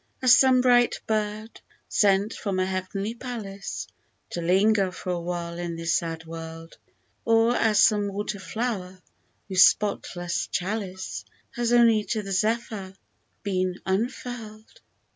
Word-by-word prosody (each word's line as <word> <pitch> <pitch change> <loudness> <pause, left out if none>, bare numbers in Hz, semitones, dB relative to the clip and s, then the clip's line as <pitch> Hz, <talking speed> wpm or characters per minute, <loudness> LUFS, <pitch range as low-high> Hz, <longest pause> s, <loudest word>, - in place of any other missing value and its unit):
As 250 -1 +7
some 260 -1 +5
bright 245 -1 +4
bird, 215 0 -3 0.3
sent 200 +1 +2
from 200 -3 -3
a 185 - +2
heavenly 190 +3 -3
palace 220 -6 -6 0.5
To 170 - -3
linger 195 +2 +3
for 185 0 -5
a 175 - -1
while 170 0 -4
in 170 -1 -4
this 165 0 -1
sad 165 -1 -2
world, 165 0 -9 0.5
Or 230 +1 +3
as 215 -2 +3
some 210 -2 +4
water 200 +1 -4
flower, 190 -3 -4 0.5
whose 190 -2 +7
spotless 175 -4 -1
chalice 190 -1 -4 0.3
Has 240 -1 -1
only 230 -3 +5
to 215 -2 -2
the 195 - -6
zephyr 210 -1 -1 0.5
been 185 -2 -1
unfurPd. 220 +1 -4
200 Hz, 130 wpm, -25 LUFS, 185-225 Hz, 0.5 s, As